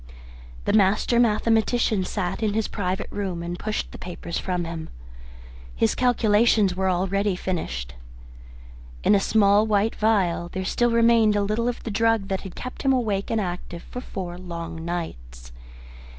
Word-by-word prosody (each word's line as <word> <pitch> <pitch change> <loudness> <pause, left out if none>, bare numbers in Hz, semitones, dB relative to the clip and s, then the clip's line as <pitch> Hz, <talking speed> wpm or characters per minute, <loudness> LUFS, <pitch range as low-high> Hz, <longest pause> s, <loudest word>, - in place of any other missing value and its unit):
The - - +1
master 210 +3 +3
mathematician 225 -2 +2
sat 185 +1 -3
in 210 -2 0
his 220 -1 0
private 185 -2 -2
room 190 -4 -3
and 175 +1 -5
pushed 215 0 -3
the - - -10
papers 170 -1 -5
from 180 -2 -2
him. 165 -1 -6 0.9
His 110 - +2
calculations 220 -5 +3
were 190 0 0
already 190 +2 0
finished. 155 - -4 1.1
In - - +4
a 200 - +5
small 205 +1 +4
white 210 +1 +2
phial 190 -6 +1
there 190 0 -3
still 240 +5 +1
remained 230 -2 +4
a 205 - +2
little 215 +4 0
of 245 - -3
the 225 - -4
drug 225 -1 +1
that 190 -1 -1
had 190 -3 -9
kept 255 - -7
him 270 - +3
awake 210 -6 0
and 225 - +1
active 175 -3 -5
for 250 - -7
four 180 -7 -6
long 170 -2 -6
nights. - - -6
200 Hz, 160 wpm, -24 LUFS, 175-220 Hz, 1.1 s, a